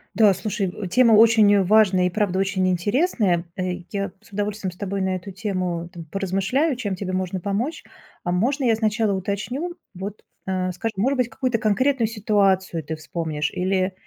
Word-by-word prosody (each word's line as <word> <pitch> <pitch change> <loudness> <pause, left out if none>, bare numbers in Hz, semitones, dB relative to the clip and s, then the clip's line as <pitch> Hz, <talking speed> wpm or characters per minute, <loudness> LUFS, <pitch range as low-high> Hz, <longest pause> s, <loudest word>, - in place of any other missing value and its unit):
Да, 210 -1 +6
слушай, 200 +1 -2
э, 190 +2 -6
тема 235 +3 +5
очень 215 -2 +6
важная 190 -2 +4
и, - - -1
правда, 190 -1 0
очень 195 -1 +1
интересная. 190 - +1
Э, 185 - -4 0.3
я 200 -1 -2
с 220 - -21
удовольствием 205 -1 -2
с - - -21
тобой 200 0 -3
на 190 0 0
эту 185 +2 -7
тему, 185 -4 -3
там, 170 - -8
поразмышляю, 195 - 0
чем 205 -6 -3
тебе 185 0 -4
можно 185 0 -2
помочь. 205 - -2 0.4
А 175 - 0
можно 260 +9 +1
я 230 -2 +4
сначала 220 -1 +1
уточню, 205 - -3 0.2
вот, 195 +3 -6 0.3
э, 185 -1 -1
скажи, 225 +6 -3
может 260 +8 +2
быть, 250 -2 +1
какую-то 255 -3 -1
конкретную 240 +3 +2
ситуацию 195 -5 +1
ты 160 - -4
вспомнишь 155 -2 -3
или 185 +1 0
200 Hz, 175 wpm, -23 LUFS, 185-220 Hz, 0.4 s, Да